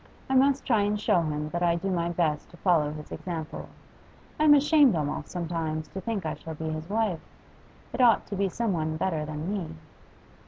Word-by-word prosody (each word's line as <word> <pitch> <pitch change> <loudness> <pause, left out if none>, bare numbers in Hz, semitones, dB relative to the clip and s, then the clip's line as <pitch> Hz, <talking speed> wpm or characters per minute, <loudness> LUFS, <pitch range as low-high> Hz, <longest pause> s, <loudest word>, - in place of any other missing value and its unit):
I - - +2
must 275 +1 +3
try 225 -5 +3
and 205 +1 0
show 205 -4 +3
him 150 -1 -2
that 170 +2 -3
I 170 -1 +3
do 190 +3 -2
my 170 -1 0
best 165 -3 -1
to 175 - -15
follow 165 -6 +2
his 150 0 -9
example. 165 -4 -6 0.7
I'm 305 -1 +7
ashamed 290 - +5
almost, 150 -2 -3
sometimes, 165 -3 -3
to 190 - -6
think 215 -5 -3
I 155 - -1
shall 160 -1 -8
be 160 +1 -4
his 155 +2 -5
wife. 210 -6 0 0.7
It - - -1
ought 235 -3 +5
to 205 - -5
be 195 0 0
some 225 +1 -1
one 155 -1 -1
better 160 -3 -1
than 155 +5 -4
me. 165 -6 -4
175 Hz, 200 wpm, -27 LUFS, 155-210 Hz, 0.7 s, I'm